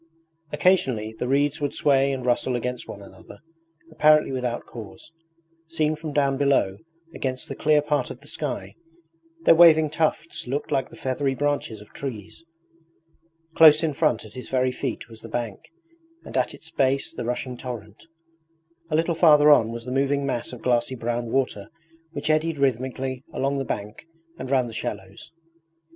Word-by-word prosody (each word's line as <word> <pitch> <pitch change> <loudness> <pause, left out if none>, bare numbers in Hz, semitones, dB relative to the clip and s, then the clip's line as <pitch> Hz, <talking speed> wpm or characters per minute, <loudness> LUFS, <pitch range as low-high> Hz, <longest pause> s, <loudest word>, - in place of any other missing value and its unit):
Occasionally 135 - +2
the 125 - -2
reeds 140 +2 +1
would 145 0 -2
sway 140 -1 +3
and 130 -2 -4
rustle 125 +1 +1
against 125 0 -4
one 100 - -9
another 100 - -14 0.5
apparently 155 -2 +4
without 125 -2 -3
cause. 115 +6 -11 0.6
Seen 155 -1 0
from 155 0 -6
down 140 -2 +1
below, 135 -9 +2 0.4
against 130 +3 -4
the 135 - -6
clear 150 0 +3
part 150 -1 0
of - - -8
the - - -19
sky, - - -4 0.7
their - - +7
waving 160 -2 +6
tufts 160 -2 -1
looked 140 +4 -3
like 135 - 0
the - - -13
feathery 135 +1 -1
branches 145 -7 -2
of 105 - -16
trees. 125 0 -7 1.1
Close 155 -1 +7
in 155 -2 0
front 120 -4 +1
at 110 - -13
his 125 - -9
very 130 -1 +1
feet - - -4
was 115 -2 -14
the 115 - -10
bank, 115 -3 -5 0.5
and - - -9
at - - 0
its - - -14
base 135 +1 0
the - - -5
rushing 125 +1 -3
torrent. 115 -1 -8 0.8
A 155 - 0
little 165 +2 +1
farther 150 -3 +6
on 115 -6 +5
was 115 0 -6
the 125 - -5
moving 140 +1 +1
mass 125 -3 -3
of 125 - -10
glassy 120 +1 +1
brown 120 0 -3
water 125 -6 -1 0.4
which 150 0 -1
eddied 155 0 +1
rhythmically 130 0 -1
along 140 +1 -1
the - - -1
bank 105 +7 -6 0.3
and 130 - -6
round 130 -2 +2
the 115 - -9
shallows. 100 +4 -6
135 Hz, 170 wpm, -24 LUFS, 120-150 Hz, 1.1 s, their